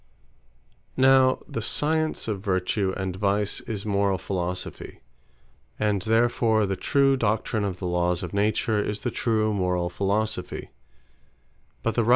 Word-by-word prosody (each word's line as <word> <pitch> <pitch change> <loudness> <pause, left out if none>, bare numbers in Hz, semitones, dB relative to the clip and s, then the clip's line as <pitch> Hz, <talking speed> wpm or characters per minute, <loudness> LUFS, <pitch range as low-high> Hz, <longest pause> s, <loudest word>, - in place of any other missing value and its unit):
Now 130 0 +5
the 115 - -4
science 155 +6 0
of 105 -3 -2
Vertue 95 0 0
and 95 -2 -3
Vice, 100 +1 0
is 105 -2 -4
Morall 100 -2 +1
Philosophie; 90 0 -4 0.8
and 105 -2 +1
therfore 115 0 +2
the 95 0 -1
true 135 +7 +2
Doctrine 110 -2 0
of 95 -3 -2
the 95 - -6
Lawes 90 0 0
of 90 - -6
Nature, 105 +1 +1
is 105 0 -3
the 120 - -2
true 110 -2 +1
Morall 90 -2 0
Philosophie. 100 0 -2
105 Hz, 125 wpm, -25 LUFS, 95-110 Hz, 0.8 s, Now